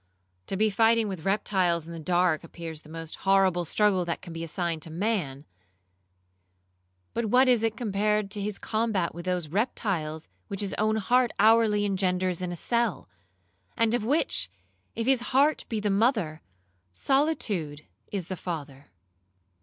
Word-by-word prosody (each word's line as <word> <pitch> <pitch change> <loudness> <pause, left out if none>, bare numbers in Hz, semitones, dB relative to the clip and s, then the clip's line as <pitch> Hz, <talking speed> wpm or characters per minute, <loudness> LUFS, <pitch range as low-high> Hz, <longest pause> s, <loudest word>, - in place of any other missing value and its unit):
To 195 - -2
be 215 +1 +2
fighting 225 +1 +3
with 185 -5 -6
reptiles 190 -4 +1
in 170 - -8
the 165 - -7
dark 175 0 +1
appears 165 -2 -7
the 155 - -17
most 165 0 -6
horrible 190 -3 +2
struggle 195 +2 +2
that 170 - -2
can 170 - -8
be 165 0 -5
assigned 165 0 -2
to 165 - -7
man; 165 -6 -2 1.7
but 235 - -1
what 250 +5 +4
is 245 -3 +4
it 225 -1 -1
compared 210 -2 0
to 205 -1 -2
his 205 0 -3
combat 215 -6 -1
with 170 +2 -8
those 180 -4 -1
reptiles 170 - -2 0.2
which 200 0 -4
his 200 - -1
own 215 +1 +2
heart 240 +3 +2
hourly 215 -1 +4
engenders 185 -2 0
in 180 -1 -3
a - - -4
cell, 235 +3 0 0.7
and 230 0 +2
of 240 -3 0
which, 285 +9 0 0.5
if 230 - -2
his 265 -1 +3 0.2
heart 295 +2 +3
be 225 - -1
the 210 -1 0
mother, 195 - +1 0.5
solitude 200 - 0 0.3
is 195 -4 -3
the 185 - -5
father. 145 -6 -7
195 Hz, 160 wpm, -27 LUFS, 170-220 Hz, 1.7 s, what